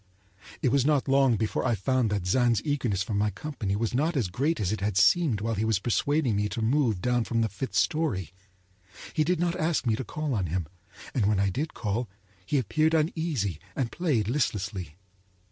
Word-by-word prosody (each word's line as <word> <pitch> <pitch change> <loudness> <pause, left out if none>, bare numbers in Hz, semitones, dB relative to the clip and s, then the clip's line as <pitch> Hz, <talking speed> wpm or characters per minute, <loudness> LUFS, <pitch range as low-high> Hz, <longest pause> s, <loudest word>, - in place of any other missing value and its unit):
It 125 - +3
was 140 -1 +3
not 145 -1 +2
long 135 -3 +4
before 110 0 -1
I 120 - +2
found 125 +3 +1
that 100 -3 -2
Zann's 120 +3 +3
eagerness 125 - 0
for 105 - -5
my 105 +1 +2
company 105 -2 -4
was 115 +2 -1
not 155 +5 +1
as 110 -9 0
great 145 - 0
as 95 -2 0
it 110 - -3
had 100 -1 -1
seemed 135 - +4
while 115 +1 -1
he 105 0 -1
was 110 -2 +2
persuading 125 +4 +1
me 105 +1 0
to 110 +3 -4
move 115 -5 +1
down 125 -1 +2
from 115 0 -1
the 110 - +2
fifth 100 +7 -5
story. 130 - 0 0.8
He 155 - +2
did 175 +2 0
not 175 0 0
ask 160 -2 0
me 115 -3 +2
to 130 - -4
call 150 +1 -3
on 95 -6 0
him, 85 +1 -2 0.5
and 110 -6 +1
when 105 -2 +2
I 100 -1 +2
did 150 - -3
call 110 +2 -2 0.3
he 145 - 0
appeared 155 +6 +2
uneasy 155 - -1 0.2
and 125 -5 -1
played 145 - 0
listlessly. 100 - -2
120 Hz, 205 wpm, -27 LUFS, 100-145 Hz, 0.8 s, long